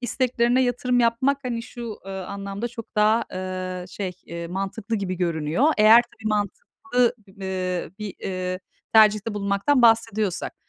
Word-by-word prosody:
isteklerine 245 0 +1
yatırım 245 0 +1
yapmak, 240 +4 +2
hani, 235 -2 -2
şu, 235 -2 -7
ııı, 190 -1 -5
anlamda 200 +3 -5
çok 230 -1 -10
daha, 215 +2 +4
ııı, 185 -1 -4
şey, 190 -1 -4
eee, 170 0 -6
mantıklı 195 +5 -3
gibi 195 -3 -2
görünüyor. 165 - 0
Eğer 220 +3 +8
tabii 220 -2 -7
mantıklı, 245 - 0
b - - -18 0.5
ııı, - - -12
bir, 210 -2 -6
ııı, 185 -1 -3 0.3
tercihte 215 0 +5
bulunmaktan 200 +7 +1
bahsediyorsak. 225 -4 +2
215 Hz, 140 wpm, -24 LUFS, 190-235 Hz, 0.5 s, Eğer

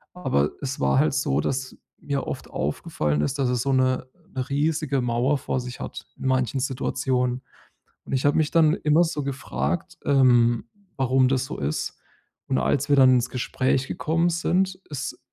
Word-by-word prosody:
aber 75 - +1
es 135 -1 -4
war 70 0 +2
halt - - +2
so, 70 - +1
dass 130 -1 -3 0.2
mir 140 -1 -2
oft - - -5
aufgefallen 75 - -1
ist, 125 - -1
dass 130 - +2
er 125 - +1
so 135 +3 0
'ne 130 0 +1 0.3
'ne 130 0 -3
riesige 145 -1 0
Mauer 125 +4 +1
vor 130 - -2
sich 125 0 -8
hat, - - -7
in - - -8
manchen 130 0 +1
Situationen. 125 -1 -1 0.6
Und - - -6
ich 135 +1 0
habe 145 - +3
mich 155 -1 +1
dann 160 0 +4
immer 155 -2 +3
so 160 -4 -2
gefragt, 165 +5 -3
ähm, 120 -4 +4 0.3
warum 130 0 +3
das 130 -1 +1
so - - -6
ist. 75 +2 -3 0.5
Und 65 - +1
als 130 - 0
wir 145 - +5
dann 130 -1 +7
ins 125 0 +1
Gespräch 130 +1 0
gekommen 165 +2 0
sind, 185 +3 +1
ist 140 -2 -5
130 Hz, 175 wpm, -24 LUFS, 125-145 Hz, 0.6 s, dann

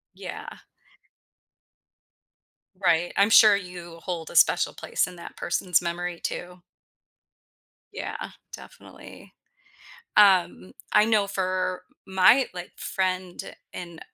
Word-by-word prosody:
Yeah. - - -8 2.3
Right. 175 -1 +2
I'm 200 +2 +4
sure 215 -2 +8
you 175 -3 -9
hold 170 -4 -5
a - - -7
special - - +4
place - - -1
in 180 - -11
that 170 - -11
person's 175 0 0
memory 175 0 -4
too. 180 0 -6 1.3
Yeah. - - -6 0.2
Definitely. - - -13 0.9
Um, 180 - +4 0.2
I 210 - +6
know 215 -3 +2
for 185 -1 -2 0.2
my, 190 +8 +5
like, 180 -1 -8
friend 185 -1 -3 0.2
in 170 -2 -8
180 Hz, 100 wpm, -25 LUFS, 175-190 Hz, 2.3 s, sure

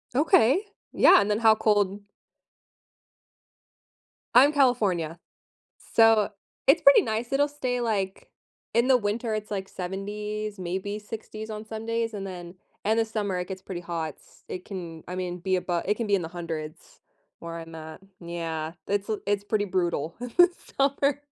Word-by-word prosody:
Okay. 285 - +4 0.3
Yeah. - - +7
And 205 - -1
then 210 - +1
how 220 -1 +6
cold 205 -2 +1 2.3
I'm 280 +5 +7
California, 195 - +2 0.7
so, 225 -2 +5 0.4
it's 330 +5 +6
pretty 280 - +8
nice. 230 +3 -3
It'll 285 +1 +3
stay, 255 -4 -2
like 195 -5 -2 0.4
in 235 +2 +3
the 260 - +6
winter, 220 +1 -2
it's, 215 0 -4
like, 195 -1 -3
70s, 210 +3 -5
maybe 190 +3 -3
60s 215 0 -8
on 215 0 -6
Sundays, 225 +1 -3
and 195 -1 -5
then 175 -1 -8 0.3
in 220 +1 +3
the 225 - +4
summer, 205 -4 -2
it 180 - -4
gets 190 -1 -6
pretty 185 -2 -6
hot 165 -3 -3
s - - -23
It 185 - -6
can, 170 -5 -7
I 180 - -4
mean, 180 -1 -3
be 185 +1 +1
abo 175 -1 -1
it 210 - +1
can 230 -1 -3
be 200 - +4
in 185 - -1
the 160 - -5
100s 165 -2 -7 0.4
where 170 0 -6
I'm 165 0 -9
at. 160 0 -9 0.2
Yeah. 165 -2 -4
It's 205 +2 -1
l 215 - -1
it's 205 0 0
pretty 205 0 0
brutal 170 -4 -1
in 245 -1 -5
the 355 0 +8 0.3
summer. 280 +1 +2
205 Hz, 165 wpm, -26 LUFS, 180-225 Hz, 2.3 s, pretty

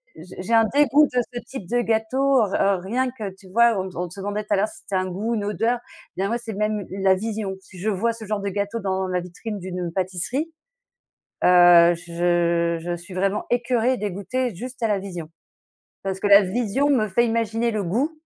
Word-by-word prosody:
j'ai 175 +3 -10
j'ai 230 +5 -3
un 225 -1 +6
dégoût 290 +1 +5
de 250 - +3
ce 240 - -3
type 210 -10 -8
de 245 0 +2
gâteau, 250 +4 +2
heu, - - -5
r 195 -2 +2
rien 250 +7 -1
que, 215 -5 -6
tu 190 -1 -15
vois, 235 +2 +4
on 190 - -3
on 180 0 -3
se 195 - -10
demandait 205 +2 -3
tout 210 - -2
à - - +5
l'heure 205 +3 +2
si - - -11
c'était 195 - -5
un 185 0 +1
goût, 210 +6 -2
une 205 - -2
odeur 225 +4 0
et 215 -5 -11
bien 195 - +1
moi, 235 +2 0
c'est 225 -2 -7
même 210 +1 -1
l 195 - -5
la 190 -1 +6
vision. 215 0 -3
Si 185 -1 -14
je 215 +4 -1
vois 220 +4 0
ce 225 -1 -8
genre 210 0 -2
de 200 - -2
gâteau 205 +3 -2
dans 190 -2 -1
la 180 -1 0
vitrine 185 +4 -6
d'une 180 -2 -4
pâtisserie, 190 - -1 0.9
heu, 175 -1 +7
je 170 0 0
je 175 +1 -3
suis 175 +2 -10
vraiment 195 +2 0
écœurée 245 0 +1
et - - -3
dégoûtée, 210 +5 -3
juste 250 +6 -8
à 225 - +2
la 205 -2 +1
vision. 180 -5 -7 0.8
Parce 190 -1 -3
que 205 - 0
la 200 +1 +8
vision 235 +8 0
me 240 -7 +3
fait 235 +5 +3
imaginer 230 0 0
le 215 -2 -2
goût. 235 - 0
205 Hz, 225 wpm, -23 LUFS, 185-230 Hz, 0.9 s, la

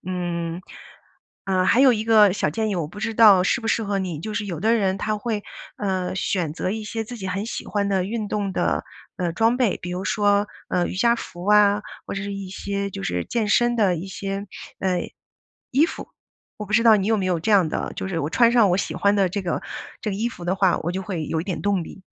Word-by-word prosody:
嗯， 175 -1 -3 0.8
呃， 185 -1 +1
还 250 - +4
有 265 -2 +7
一 215 -1 -1
个 215 -4 +6
小 - - 0
建 215 +7 -1
议， 195 - -1
我 165 -4 -1
不 205 +6 -11
知 225 +1 -2
道 210 -5 +7
适 210 - +1
不 225 - -4
适 225 - +1
合 200 -1 -1
你 180 -5 -3
就 215 +4 -5
是 210 -1 -2
有 170 -5 -4
的 220 +5 +2
人 195 -3 +1
他 215 +2 -1
会， 215 -2 -2 0.3
呃， 190 -3 -2
选 180 -5 -1
择 185 - -2
一 220 +1 -3
些 225 +1 -4
自 245 +2 -8
己 190 - -5
很 195 +3 -2
喜 230 - -5
欢 200 -1 -1
的 190 -2 +1
运 215 +1 -3
动 200 -2 -2
的， - - 0 0.3
呃， 175 -3 -1
装 225 +4 +3
备。 235 -7 +2
比 175 - -5
如 180 +1 -3
说， 205 +1 +2 0.2
呃， 175 - +1
瑜 - - -5
伽 235 +4 +4
服 175 -6 -8
啊， 210 0 +5 0.2
或 - - -4
者 195 - -3
是 200 0 -4
一 195 -1 -6
些 200 +1 -3
就 95 - -7
是 90 -1 -2
健 225 -3 -1
身 240 +2 +3
的 195 -6 +3
一 175 +5 -6
些， 195 +1 -4 0.3
呃， 185 -2 0 0.7
衣 285 +5 +5
服。 - - -8 0.5
我 210 - -6
不 210 - -2
知 230 - +5
道 225 -2 +7
你 195 0 -1
有 220 0 +3
没 195 - -1
有 180 -3 0
这 220 - -1
样 195 -5 +5
的 - - -3
就 - - -3
是 175 -4 -2
我 145 - -1
穿 235 +6 +4
上 230 -5 +5
我 180 - +2
喜 195 - -2
欢 200 0 +2
的 190 -3 +2
这 200 - -2
个 180 - -2 0.4
这 215 - -1
个 - - -3
衣 225 +4 -1
服 175 -7 -10
的 180 +2 0
话， 190 -2 +3
我 175 +2 -2
就 190 - -3
会 180 -5 -4
有 160 +2 -2
一 - - -5
点 185 - -4
动 200 -3 +1
力。 190 - -11
200 Hz, 275 characters per minute, -23 LUFS, 185-215 Hz, 0.8 s, 有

